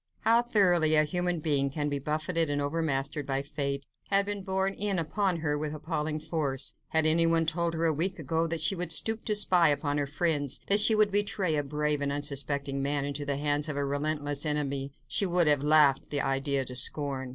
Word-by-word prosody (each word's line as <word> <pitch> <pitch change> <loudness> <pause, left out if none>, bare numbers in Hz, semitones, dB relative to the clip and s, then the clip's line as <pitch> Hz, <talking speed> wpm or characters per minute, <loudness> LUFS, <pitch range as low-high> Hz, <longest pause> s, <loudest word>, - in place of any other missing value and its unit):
How 230 +1 +4
thoroughly 180 -9 +2
a 155 - +5
human 175 +1 -2
being 140 -3 0
can 145 +1 -3
be 145 -1 -2
buffeted 155 +3 -1
and 145 0 -1
overmastered 145 -1 -2
by 135 0 -1
Fate, 140 -1 -4 0.2
had 200 0 +3
been 205 -1 -4
borne 190 0 -1
in 200 -1 -2
upon 175 +1 -1
her 150 -2 -1
with 155 0 -4
appalling 155 0 -3
force. 150 -4 -2
Had 160 -1 +2
anyone 165 +1 +3
told 165 +1 -1
her 165 +1 -1
a 160 - +2
week 180 +6 -2
ago 160 +2 -1
that 165 -1 -1
she 155 +4 +3
would 180 -3 -1
stoop 220 +6 +2
to 210 - 0
spy 180 -5 +4
upon 145 0 -1
her 145 - -1
friends, 145 -2 -1
that 200 +1 +5
she 220 +1 +4
would 215 -1 +3
betray 200 -4 +1
a 145 - +1
brave 150 +1 -1
and 140 0 -1
unsuspecting 140 -1 -2
man 140 0 -1
into 145 0 -4
the 140 -1 -2
hands 145 +1 -1
of 145 - -4
a 140 - -1
relentless 145 0 -2
enemy, 140 -2 -2 0.2
she 200 - +1
would 175 -1 +2
have 145 -2 +3
laughed 150 -2 +3
the 145 -1 -1
idea 135 0 0
to 125 - -8
scorn. 135 -1 +1
150 Hz, 210 wpm, -28 LUFS, 145-170 Hz, 0.2 s, a